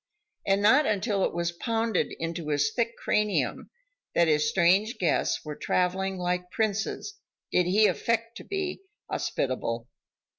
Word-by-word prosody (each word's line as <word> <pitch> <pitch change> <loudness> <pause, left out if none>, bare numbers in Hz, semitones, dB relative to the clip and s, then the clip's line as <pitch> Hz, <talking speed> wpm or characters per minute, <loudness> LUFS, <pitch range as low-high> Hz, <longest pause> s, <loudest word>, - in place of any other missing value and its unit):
And 195 +1 +2
not 265 +8 +5
until 205 -1 0
it - - -1
was 170 0 0
pounded 225 +3 -1
into 165 -1 -4
his 145 +6 +1
thick 235 -1 -1
cranium, 210 -1 0 0.5
that 170 - +4
his 150 -1 +3
strange 190 +7 +3
guests 170 -2 0
were 150 -1 -5
traveling 190 +3 0
like 180 0 -2
princes 220 - -2 0.3
did 180 -1 +3
he 210 +4 +4
affect 230 +1 0
to - - -9
be 385 -2 -3 0.3
hospitable. 120 -3 -2
190 Hz, 140 wpm, -27 LUFS, 170-225 Hz, 0.5 s, not